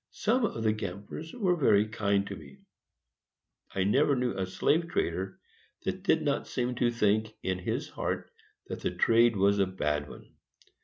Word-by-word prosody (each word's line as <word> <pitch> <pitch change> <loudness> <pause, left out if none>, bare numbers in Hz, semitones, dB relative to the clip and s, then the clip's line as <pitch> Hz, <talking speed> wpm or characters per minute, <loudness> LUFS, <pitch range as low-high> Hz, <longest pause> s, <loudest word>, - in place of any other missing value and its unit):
Some 230 +3 +1
of 115 - -3
the 110 -1 +3
gamblers 105 - -6
were 190 -7 +1
very 110 -9 +4
kind 100 -2 0
to 100 - -6
me: 70 -6 -13 1.2
I 95 - +2
never 140 +8 +3
knew 125 -4 -1
a 95 -1 -2
slave 165 - +1
trader 95 - -2 0.4
that - - -3
did - - +2
not - - 0
seem 125 0 -1
to 120 - +3
think, 110 -1 +1
in 95 -1 -1
his 90 - -2
heart, - - -3 0.3
that - - -6
the - - -1
trade 115 +5 +4
was 100 +1 +3
a 95 - +3
bad 75 -6 -2
one. - - -13
105 Hz, 170 wpm, -29 LUFS, 95-125 Hz, 1.2 s, very